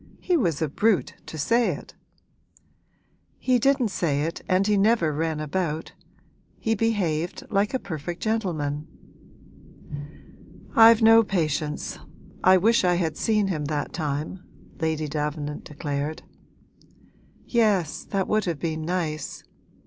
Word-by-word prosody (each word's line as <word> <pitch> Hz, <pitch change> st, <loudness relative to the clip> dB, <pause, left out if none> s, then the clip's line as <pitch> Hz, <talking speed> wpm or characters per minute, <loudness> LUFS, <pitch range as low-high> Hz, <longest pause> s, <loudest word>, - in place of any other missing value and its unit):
He 360 Hz, -, +1 dB
was 170 Hz, -, +1 dB
a -, -, +1 dB
brute 205 Hz, +7 st, +1 dB
to 160 Hz, -, -7 dB
say 230 Hz, +11 st, +2 dB
it!' -, -, -12 dB, 1.4 s
'He 255 Hz, -1 st, +2 dB
didn't 270 Hz, -2 st, +2 dB
say 150 Hz, -7 st, 0 dB
it 165 Hz, +2 st, -3 dB
and 185 Hz, +1 st, +3 dB
he 210 Hz, 0 st, +3 dB
never 200 Hz, -6 st, +3 dB
ran 160 Hz, +1 st, -1 dB
about. 155 Hz, +1 st, -2 dB, 0.6 s
He 225 Hz, -, 0 dB
behaved 190 Hz, -7 st, -1 dB
like 205 Hz, +4 st, +1 dB
a -, -, 0 dB
perfect 175 Hz, -, -6 dB
gentleman.' 160 Hz, -10 st, -1 dB, 1.9 s
'I've 225 Hz, 0 st, +8 dB
no 225 Hz, +1 st, +8 dB
patience 155 Hz, -7 st, -2 dB, 0.4 s
I 185 Hz, 0 st, +7 dB
wish 225 Hz, +5 st, +3 dB
I 180 Hz, -1 st, +3 dB
had 165 Hz, -3 st, -1 dB
seen 210 Hz, 0 st, +1 dB
him 155 Hz, -5 st, -2 dB
that 145 Hz, -1 st, -3 dB
time!' 150 Hz, +2 st, -3 dB, 0.4 s
Lady 160 Hz, -2 st, -1 dB
Davenant 150 Hz, 0 st, -3 dB
declared. 145 Hz, +1 st, -4 dB, 1.2 s
'Yes, 210 Hz, -, +1 dB
that 195 Hz, -2 st, -1 dB
would 215 Hz, -1 st, +1 dB
have 170 Hz, -4 st, -1 dB
been 160 Hz, 0 st, -3 dB
nice! 160 Hz, -2 st, -3 dB
175 Hz, 125 wpm, -25 LUFS, 155-215 Hz, 1.9 s, I've